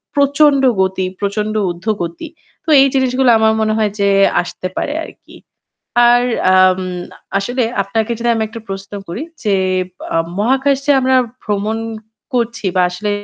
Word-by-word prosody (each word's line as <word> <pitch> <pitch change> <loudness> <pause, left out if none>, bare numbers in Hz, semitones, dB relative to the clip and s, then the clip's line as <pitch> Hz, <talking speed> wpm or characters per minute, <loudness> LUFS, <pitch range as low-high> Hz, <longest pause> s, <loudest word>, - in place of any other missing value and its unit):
প্রচণ্ড 285 0 +4 0.2
গতি, 190 0 0
প্রচণ্ড 210 +1 -2 0.2
ঊর্ধ্বগতি। 175 - -4 0.4
তো - - -5
এই 275 - +5
জিনিসগুলো 260 -1 +2
আমার 220 0 +3
মনে 215 0 +1
হয় 210 -2 +1
যে 200 0 +3 0.3
আসতে 185 +1 -6
পারে 290 - -2
আরকি। - - -14 0.7
আর 245 0 +5 0.3
আম 185 0 +4 0.6
আসলে 245 +6 -2 0.2
আপনাকে 220 +4 -2
যদি 235 0 -1
আমি 225 - -1
একটা 230 +1 -9
প্রশ্ন 195 +1 -7 0.2
করি 185 - -5 0.2
যে 205 -2 +2 0.4
বা - - -9 0.3
মহাকাশে 270 +5 +1
আমরা 260 0 +2 0.3
ভ্রমণ 210 +1 -2 0.6
করছি 235 -4 -1
বা 185 - +4
আসলে 205 +4 -3
220 Hz, 140 wpm, -16 LUFS, 195-255 Hz, 0.7 s, এই